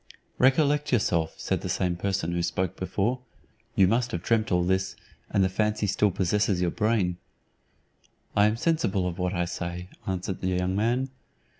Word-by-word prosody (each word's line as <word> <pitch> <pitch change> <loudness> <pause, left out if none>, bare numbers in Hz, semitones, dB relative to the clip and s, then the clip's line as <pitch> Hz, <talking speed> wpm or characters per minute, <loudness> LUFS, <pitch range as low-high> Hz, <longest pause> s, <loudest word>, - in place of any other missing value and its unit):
"Recollect 145 +2 +3
yourself," 85 -9 +1
said - - -1
the - - -4
same 90 -1 0
person 95 -1 -1
who 85 0 0
spoke 90 +1 -1
before; 100 +7 -1 0.6
"you 95 -5 +5
must 120 +4 +1
have 85 0 -3
dreamt 110 -2 +1
all 90 -1 +3
this, 95 +1 0 0.3
and 100 - +2
the - - +4
fancy 105 +2 0
still 105 +1 +2
possesses 95 +1 +1
your 90 -1 +1
brain." 105 -5 +1 1.2
"I 105 0 +5
am 105 +1 0
sensible 115 - +1
of 90 +1 -5
what 90 +1 0
I 85 0 +1
say," 85 +1 -5 0.2
answered 95 0 -3
the 95 - -1
young 90 0 0
man. 120 +6 +1
95 Hz, 170 wpm, -27 LUFS, 90-110 Hz, 1.2 s, you